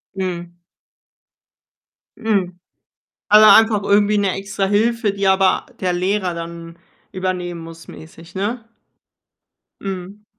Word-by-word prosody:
Mhm. 175 Hz, -2 st, -4 dB, 1.6 s
Mhm. 190 Hz, -5 st, -1 dB, 0.7 s
Aber 215 Hz, +1 st, +8 dB
einfach 220 Hz, -2 st, +4 dB
irgendwie 205 Hz, +1 st, +3 dB
'ne 200 Hz, -2 st, +1 dB
Extrahilfe, 205 Hz, +3 st, 0 dB
die 200 Hz, -1 st, -1 dB
aber 190 Hz, 0 st, +2 dB
der 180 Hz, -1 st, 0 dB
Lehrer 185 Hz, +1 st, -1 dB
dann 170 Hz, 0 st, -8 dB, 0.3 s
übernehmen 180 Hz, -2 st, -4 dB
muss 165 Hz, 0 st, -12 dB
mäßig, 165 Hz, +2 st, -13 dB
ne? 215 Hz, +5 st, -3 dB, 1.2 s
Mhm. 195 Hz, +2 st, -7 dB
190 Hz, 100 wpm, -19 LUFS, 175-205 Hz, 1.6 s, Aber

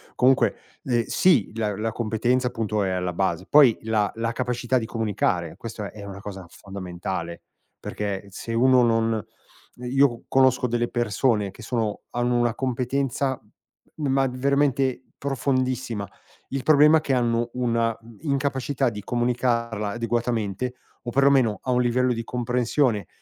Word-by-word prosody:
Comunque, 130 Hz, +1 st, +3 dB, 0.3 s
ehm, 120 Hz, -2 st, +1 dB
sì, 155 Hz, -, +3 dB
la 105 Hz, -3 st, -1 dB
la 110 Hz, +2 st, -2 dB
competenza 120 Hz, +3 st, 0 dB
appunto, 105 Hz, -3 st, -1 dB
è 95 Hz, -, 0 dB
alla 90 Hz, -1 st, -2 dB
base. 95 Hz, -1 st, -1 dB
Poi, 140 Hz, -6 st, +6 dB
la 110 Hz, -2 st, +1 dB
la 115 Hz, +1 st, -1 dB
capacità 125 Hz, 0 st, -1 dB
di 115 Hz, -, -1 dB
comunicare, 100 Hz, -7 st, -1 dB
questo 115 Hz, -2 st, -7 dB
è 105 Hz, -1 st, -10 dB
una 100 Hz, -1 st, -8 dB
cosa 95 Hz, -3 st, -8 dB
fondamentale. 90 Hz, -3 st, -6 dB, 0.4 s
Perché, 100 Hz, -1 st, -4 dB
se 115 Hz, +4 st, -6 dB
uno 125 Hz, +1 st, +5 dB
non 115 Hz, -2 st, +1 dB, 0.5 s
io 125 Hz, 0 st, +1 dB
conosco 130 Hz, -1 st, +3 dB
delle 120 Hz, 0 st, 0 dB
persone 110 Hz, -2 st, +1 dB
che 115 Hz, -, -14 dB
sono 110 Hz, -3 st, -2 dB
hanno 120 Hz, 0 st, 0 dB
una 120 Hz, -1 st, +2 dB
competenza, 130 Hz, +1 st, -1 dB, 0.5 s
ma 135 Hz, -3 st, +1 dB
veramente 135 Hz, 0 st, +1 dB
profondissima. 130 Hz, -5 st, -1 dB, 0.4 s
Il 135 Hz, -1 st, -3 dB
problema 150 Hz, +1 st, +6 dB
è 155 Hz, -, -1 dB
che 135 Hz, -, -1 dB
hanno 120 Hz, -1 st, +1 dB
una 115 Hz, -2 st, 0 dB, 0.3 s
incapacità 140 Hz, -2 st, 0 dB
di 105 Hz, -2 st, -7 dB
comunicarla 120 Hz, -3 st, 0 dB
adeguatamente, 115 Hz, 0 st, -2 dB, 0.3 s
o 120 Hz, -, -4 dB
perlomeno, 135 Hz, -6 st, +3 dB
a 130 Hz, -, -1 dB
un 125 Hz, 0 st, +3 dB
livello 125 Hz, +1 st, +2 dB
di 115 Hz, 0 st, -4 dB
comprensione 125 Hz, -, 0 dB
120 Hz, 140 wpm, -24 LUFS, 105-130 Hz, 0.5 s, Poi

